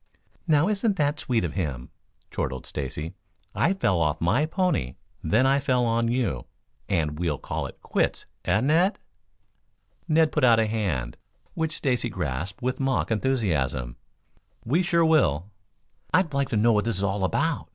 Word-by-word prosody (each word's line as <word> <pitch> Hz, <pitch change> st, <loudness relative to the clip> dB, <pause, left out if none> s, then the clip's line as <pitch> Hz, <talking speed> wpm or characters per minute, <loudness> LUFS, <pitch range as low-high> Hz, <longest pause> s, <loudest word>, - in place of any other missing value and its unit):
"Now, 155 Hz, +1 st, +4 dB
isn't 210 Hz, 0 st, +1 dB
that 150 Hz, -2 st, 0 dB
sweet 115 Hz, -7 st, 0 dB
of 85 Hz, -, -4 dB
him?" 70 Hz, -10 st, -4 dB, 0.4 s
chortled 65 Hz, -1 st, -3 dB
Stacy. 75 Hz, +3 st, -5 dB, 0.4 s
"I 180 Hz, -, +2 dB
fell 95 Hz, -, +1 dB
off 75 Hz, -1 st, +1 dB
my 110 Hz, -, +2 dB
pony, 165 Hz, -, 0 dB, 0.3 s
then 110 Hz, +11 st, +3 dB
I 135 Hz, +1 st, +4 dB
fell 125 Hz, -3 st, +1 dB
on 115 Hz, 0 st, +1 dB
you, 115 Hz, -, -1 dB, 0.4 s
and 80 Hz, -5 st, 0 dB
we'll 85 Hz, -5 st, 0 dB
call -, -, -4 dB
it -, -, -13 dB
quits, -, -, -1 dB, 0.2 s
eh, 95 Hz, +5 st, +2 dB
Ned?" 165 Hz, -, +3 dB, 1.1 s
Ned 160 Hz, -1 st, +3 dB
put 150 Hz, -, 0 dB
out 120 Hz, -3 st, +6 dB
a 110 Hz, -, +3 dB
hand, 95 Hz, -, -2 dB, 0.4 s
which 160 Hz, -1 st, -2 dB
Stacy 125 Hz, -3 st, 0 dB
grasped 90 Hz, -, -4 dB
with 130 Hz, +1 st, -1 dB
mock 135 Hz, -3 st, 0 dB
enthusiasm. 80 Hz, -, 0 dB, 0.7 s
"We 150 Hz, +10 st, +2 dB
sure 170 Hz, -2 st, +2 dB
will." 105 Hz, -, +2 dB, 0.6 s
"I'd 175 Hz, -4 st, +2 dB
like 140 Hz, -1 st, 0 dB
to 110 Hz, -, 0 dB
know 115 Hz, +2 st, +4 dB
what 105 Hz, 0 st, +1 dB
this 115 Hz, -4 st, -1 dB
is 100 Hz, -, -2 dB
all 100 Hz, 0 st, 0 dB
about?" 145 Hz, -, 0 dB
115 Hz, 160 wpm, -25 LUFS, -, 1.1 s, out